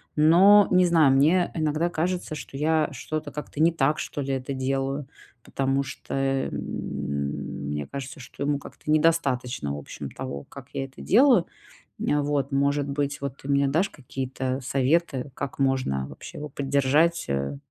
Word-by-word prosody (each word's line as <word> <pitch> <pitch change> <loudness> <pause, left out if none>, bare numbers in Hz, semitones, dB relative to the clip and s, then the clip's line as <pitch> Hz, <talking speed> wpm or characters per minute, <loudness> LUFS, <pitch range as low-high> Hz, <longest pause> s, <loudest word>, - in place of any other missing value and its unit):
но 185 +7 +7
не 180 0 +5
знаю, 160 -5 +5
мне 165 +6 +3
иногда 155 +2 0
кажется, 175 0 -2
что 135 -1 -9
я 155 +1 +2
что-то 155 +2 -4
как-то 150 0 -5
не 165 +1 +5
так, 150 -1 +1
что 145 - -4
ли, 135 0 -2
это 135 +1 -3
делаю, 135 +1 -2 0.3
потому 135 0 0
что, 135 -1 -8
эм, 135 0 0 1.2
мне 75 -1 -3
кажется, 135 -1 -7
что 135 - -7
ему 145 0 0
как-то 150 - -11
недостаточно, 135 - +1
в - - -5
общем, - - -8
того, 70 0 -6
как 140 -2 -12
я 135 - -2
это 135 - -13
делаю, 240 -3 +5 0.5
э, 150 - +1
вот. 140 -1 -1
Может 140 +1 +1
быть, 145 0 -2
вот, 140 -1 -4
ты 135 - -10
мне 140 0 +3
дашь 165 +8 +1
какие-то 130 -1 -4
советы, 135 +1 0
как 135 - -5
можно 130 - 0
вообще - - -10
его 150 - -5
поддержать, 140 +5 +2
э, 70 0 -1
140 Hz, 165 wpm, -25 LUFS, 135-155 Hz, 1.2 s, но